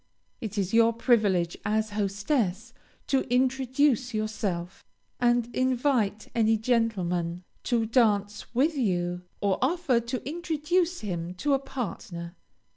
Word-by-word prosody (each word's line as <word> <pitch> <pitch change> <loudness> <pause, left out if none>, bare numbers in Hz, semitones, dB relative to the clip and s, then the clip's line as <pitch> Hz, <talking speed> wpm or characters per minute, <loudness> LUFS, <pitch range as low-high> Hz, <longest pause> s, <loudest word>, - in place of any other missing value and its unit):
It 220 -4 -6
is 195 0 -1
your 230 0 +5
privilege 210 -8 +2
as 215 0 0
hostess 205 +1 -1 0.3
to 270 -1 +2
introduce 260 0 +2
yourself, 200 -4 -3 0.4
and 240 -1 +3
invite 255 -5 +1
any 225 -1 +3
gentleman 185 -7 0 0.2
to 235 -2 +1
dance 210 -3 +1
with 300 +6 +3
you, 180 -8 0 0.2
or 200 -2 +1
offer 280 -3 +2
to 240 +2 -5
introduce 345 +2 0
him 180 -3 -4
to 285 +10 0
a 270 - +3
partner. 195 -10 -6
225 Hz, 120 wpm, -27 LUFS, 200-260 Hz, 0.4 s, your